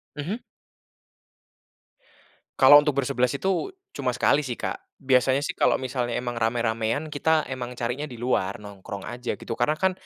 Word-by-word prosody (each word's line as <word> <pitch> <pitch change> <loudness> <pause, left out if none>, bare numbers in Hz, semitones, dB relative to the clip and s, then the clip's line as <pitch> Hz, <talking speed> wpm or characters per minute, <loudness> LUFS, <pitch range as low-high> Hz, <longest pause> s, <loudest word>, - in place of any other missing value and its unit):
Mhm. 170 +11 -4 2.2
Kalau 145 - +10
untuk 150 -2 0
bersebelas 125 -1 +1
itu 190 - 0 0.2
cuma 130 -3 -2
sekali 140 +3 +3
sih 130 -5 -3
Kak - - -4 0.2
biasanya 130 +1 +2
sih - - -1
kalau - - +2
misalnya 125 -2 -2
emang 120 -1 -3
ramai-ramaian 115 +5 0
kita 155 +1 +2
emang 125 -1 -5
carinya 125 +5 -3
di 125 - -9
luar 115 -5 0
nongkrong 100 -1 -8
aja 120 +2 -4
gitu - - -10
karena 150 +6 +2
kan 190 +3 +2
125 Hz, 150 wpm, -25 LUFS, 120-145 Hz, 2.2 s, Kalau